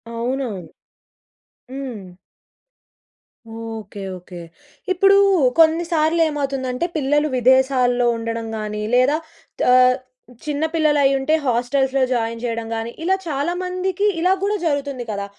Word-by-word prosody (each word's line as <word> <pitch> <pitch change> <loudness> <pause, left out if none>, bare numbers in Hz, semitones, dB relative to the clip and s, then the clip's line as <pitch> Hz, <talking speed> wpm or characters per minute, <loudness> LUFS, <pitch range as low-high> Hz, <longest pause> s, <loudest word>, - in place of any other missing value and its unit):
అవునవును. 230 - -3 1.0
హ్మ్. 260 -6 -6 1.6
Okay 225 -3 -7
okay. 180 -1 -11 0.5
ఇప్పుడూ 395 +2 +5 0.4
కొన్ని 325 +1 +5
సార్లు 320 +1 +2
ఏమవుతుందంటే 275 -1 -2
పిల్లలు 295 +1 +1
విదేశాల్లో 250 -1 +3
ఉండడం 230 0 -4
గాని, 210 0 -4
లేదా 265 +5 +3 0.6
ఆహ్, 255 0 +5 0.5
చిన్న 295 0 -2
పిల్లలైయ్యుంటే 290 -2 +2
హాస్టల్స్‌లో 265 +2 +1
జాయిన్ 230 -1 -1
చేయడం 230 -2 -3
గాని, 225 +1 -4
ఇలా 380 +3 +2
చాలా 295 +3 -1
మందికి 370 +2 -1
ఇలా 365 +3 +3
కూడా 415 +1 +1
జరుగుతుంది 285 -5 -2
కదా! 200 -1 -3
265 Hz, 105 wpm, -20 LUFS, 230-305 Hz, 1.6 s, ఇప్పుడూ